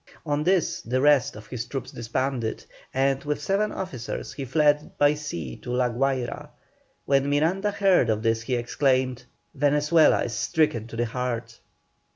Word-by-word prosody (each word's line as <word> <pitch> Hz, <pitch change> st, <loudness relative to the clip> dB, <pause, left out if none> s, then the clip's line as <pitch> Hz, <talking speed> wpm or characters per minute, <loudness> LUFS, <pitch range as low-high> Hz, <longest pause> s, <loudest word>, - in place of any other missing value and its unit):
On 150 Hz, -1 st, 0 dB
this 185 Hz, 0 st, +1 dB
the 125 Hz, +2 st, -1 dB
rest 145 Hz, -4 st, +4 dB
of 105 Hz, 0 st, -10 dB
his 120 Hz, +1 st, -5 dB
troops 130 Hz, -1 st, -5 dB
disbanded, 120 Hz, 0 st, -3 dB, 0.3 s
and, 135 Hz, +1 st, +1 dB
with 145 Hz, -1 st, -2 dB
seven 195 Hz, +7 st, 0 dB
officers, 135 Hz, -12 st, -5 dB
he 140 Hz, -, -5 dB
fled 150 Hz, +2 st, +1 dB
by 145 Hz, 0 st, +4 dB
sea 85 Hz, -, -5 dB
to -, -, -10 dB
La 125 Hz, 0 st, +1 dB
Guayra. 130 Hz, 0 st, -2 dB, 0.6 s
When 140 Hz, 0 st, +2 dB
Miranda 170 Hz, +8 st, +1 dB
heard 195 Hz, -, +3 dB
of 110 Hz, 0 st, 0 dB
this 115 Hz, -1 st, +1 dB
he 125 Hz, +2 st, -2 dB
exclaimed, 130 Hz, 0 st, 0 dB, 0.3 s
"Venezuela 150 Hz, +2 st, +3 dB
is 120 Hz, -, -4 dB
stricken 120 Hz, -9 st, 0 dB
to 115 Hz, -, -9 dB
the 120 Hz, +1 st, 0 dB
heart." 120 Hz, -1 st, -4 dB
135 Hz, 160 wpm, -25 LUFS, 120-150 Hz, 0.6 s, rest